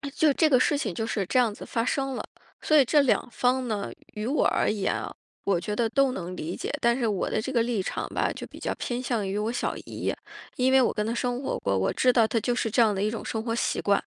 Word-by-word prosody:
就 310 Hz, -2 st, +4 dB
这 315 Hz, +1 st, +3 dB
个 255 Hz, -3 st, +5 dB
事 285 Hz, -, +2 dB
情 215 Hz, -10 st, -2 dB
就 225 Hz, -, -2 dB
是 200 Hz, -4 st, -1 dB
这 255 Hz, -, 0 dB
样 235 Hz, -4 st, +3 dB
子 -, -, -9 dB
发 230 Hz, -, -1 dB
生 270 Hz, +1 st, -1 dB
了。 -, -, -4 dB, 0.4 s
所 310 Hz, -, +2 dB
以 280 Hz, -, +7 dB
这 295 Hz, +3 st, +4 dB
两 250 Hz, -2 st, +1 dB
方 255 Hz, 0 st, +1 dB
呢， 205 Hz, -3 st, -3 dB, 0.2 s
与 210 Hz, +1 st, -4 dB
我 290 Hz, -, +2 dB
而 -, -, +1 dB
言 205 Hz, -3 st, 0 dB
啊， -, -, -4 dB, 0.3 s
我 190 Hz, -4 st, +2 dB
觉 210 Hz, +3 st, -3 dB
得 230 Hz, 0 st, +1 dB
都 275 Hz, 0 st, +3 dB
能 180 Hz, -4 st, -5 dB
理 165 Hz, +3 st, -4 dB
解， -, -, -4 dB
但 235 Hz, +1 st, +3 dB
是 235 Hz, -3 st, 0 dB
我 200 Hz, -3 st, -1 dB
的 215 Hz, -, 0 dB
这 260 Hz, -, -4 dB
个 235 Hz, -3 st, +2 dB
立 230 Hz, -5 st, -1 dB
场 -, -, -3 dB
吧， -, -, 0 dB
就 -, -, -7 dB
比 -, -, -12 dB
较 -, -, -2 dB
偏 245 Hz, 0 st, -3 dB
向 235 Hz, -5 st, -1 dB
于 195 Hz, +2 st, -2 dB
我 215 Hz, +2 st, -1 dB
小 245 Hz, -, -2 dB
姨。 -, -, -3 dB, 0.4 s
因 260 Hz, +1 st, +2 dB
为 265 Hz, 0 st, +6 dB
我 -, -, +2 dB
跟 210 Hz, -, -1 dB
她 225 Hz, -, -1 dB
生 245 Hz, +1 st, -1 dB
活 -, -, -2 dB
过， 100 Hz, -1 st, 0 dB
我 95 Hz, -, +1 dB
知 255 Hz, -, +4 dB
道 230 Hz, -3 st, +4 dB
她 230 Hz, -, 0 dB
就 240 Hz, +3 st, 0 dB
是 225 Hz, -, 0 dB
这 240 Hz, -, +4 dB
样 215 Hz, -2 st, +4 dB
的 195 Hz, -, -2 dB
一 210 Hz, -, +1 dB
种 230 Hz, -, -5 dB
生 220 Hz, -1 st, -3 dB
活 230 Hz, -1 st, -2 dB
习 -, -, 0 dB
惯。 200 Hz, -1 st, +2 dB
230 Hz, 305 characters per minute, -26 LUFS, 210-255 Hz, 0.4 s, 以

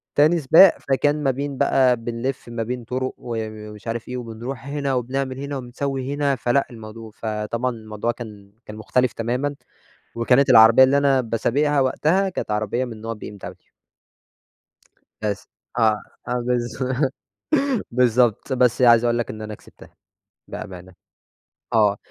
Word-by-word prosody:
تاني 155 Hz, +4 st, +4 dB
سباق، 165 Hz, +6 st, +7 dB
فكان 145 Hz, +2 st, 0 dB
ما 135 Hz, -, +3 dB
بين 140 Hz, +1 st, -4 dB
بقى 130 Hz, -1 st, +3 dB
بنلف 120 Hz, +2 st, -4 dB
ما 115 Hz, -1 st, -3 dB
بين 125 Hz, +1 st, -4 dB
طرُق 130 Hz, +2 st, -3 dB
و 120 Hz, -1 st, -6 dB, 0.3 s
ومش 105 Hz, +1 st, -12 dB
عارف 115 Hz, 0 st, -4 dB
إيه، 125 Hz, -, -4 dB
وبنروح 120 Hz, +2 st, -7 dB
هنا 140 Hz, -1 st, -2 dB
وبنعمل 130 Hz, +1 st, -2 dB
هنا 140 Hz, 0 st, -4 dB
وبنسوي 135 Hz, +1 st, -4 dB
هنا، 145 Hz, -1 st, +1 dB
فلأ، 125 Hz, +2 st, +1 dB
الموضوع 110 Hz, -1 st, -10 dB
فطبعًا 110 Hz, +3 st, -3 dB
الموضوع 110 Hz, 0 st, -4 dB
كان 105 Hz, -4 st, -10 dB
كان 105 Hz, -, -9 dB
مختلف 125 Hz, +4 st, 0 dB
تمامًا، 125 Hz, +5 st, -2 dB, 0.6 s
وكانت 125 Hz, +4 st, +3 dB
العربيّة 115 Hz, +2 st, +8 dB
اللي 135 Hz, +2 st, +3 dB
أنا 140 Hz, -2 st, +3 dB
باسابِقها 135 Hz, +5 st, +1 dB
وقتها 160 Hz, +8 st, +2 dB
كانت 180 Hz, -, -5 dB
عربيّة 105 Hz, +4 st, -1 dB
من 115 Hz, -3 st, -8 dB
نوع 115 Hz, +1 st, -4 dB
BMW. 105 Hz, -2 st, -10 dB, 1.5 s
بس، 105 Hz, -2 st, -3 dB, 0.3 s
آه، 110 Hz, -2 st, +3 dB, 0.3 s
آه، 120 Hz, -, -1 dB
بالض 120 Hz, 0 st, -2 dB, 1.1 s
بالضبط، 120 Hz, -2 st, +2 dB
بس 125 Hz, -1 st, +2 dB
عايز 120 Hz, -1 st, +6 dB
أقول 120 Hz, 0 st, +2 dB
لك 120 Hz, -, -2 dB
إن 110 Hz, 0 st, -7 dB
أنا 110 Hz, 0 st, -6 dB
كسبتها، -, -, -17 dB, 0.5 s
بأمانة. 90 Hz, -1 st, -8 dB, 0.8 s
آه. 105 Hz, -3 st, +3 dB
120 Hz, 145 wpm, -22 LUFS, 115-135 Hz, 1.5 s, العربيّة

